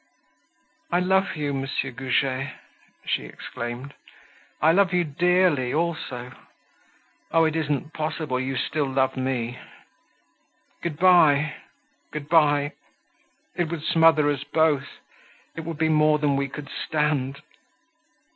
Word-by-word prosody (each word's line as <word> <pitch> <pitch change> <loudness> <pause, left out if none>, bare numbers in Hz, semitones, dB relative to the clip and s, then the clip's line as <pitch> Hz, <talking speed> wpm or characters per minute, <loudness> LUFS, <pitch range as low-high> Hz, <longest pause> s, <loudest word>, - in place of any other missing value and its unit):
"I 175 - +3
love 190 +2 +1
you, 145 -2 -2
Monsieur 135 0 -2
Goujet," 135 +1 -1 0.5
she - - -1
exclaimed. 120 +4 -7 0.7
"I 160 - +5
love 190 +1 +3
you 180 -1 +3
dearly, 170 -4 +2
also. 155 -7 -3 1.0
Oh! 165 0 +4
it 160 0 0
isn't 150 0 -2
possible 155 -4 -2
you 130 0 -2
still 145 +3 -1
love 130 0 +1
me. 125 -2 -2 1.2
Good 165 -4 -4
bye, 155 -5 +5 0.6
good 150 -1 -6
bye; 145 -3 +4 0.8
it 175 -2 -1
would 165 -2 -5
smother 160 -2 +4
us 140 -1 -3
both; 145 -2 +1 0.7
it 165 - -5
would 165 -2 -5
be 160 0 +2
more 155 -1 +4
than 145 -2 +1
we 140 0 0
could 145 +1 -8
stand." 145 -3 -1
150 Hz, 120 wpm, -24 LUFS, 135-160 Hz, 1.2 s, I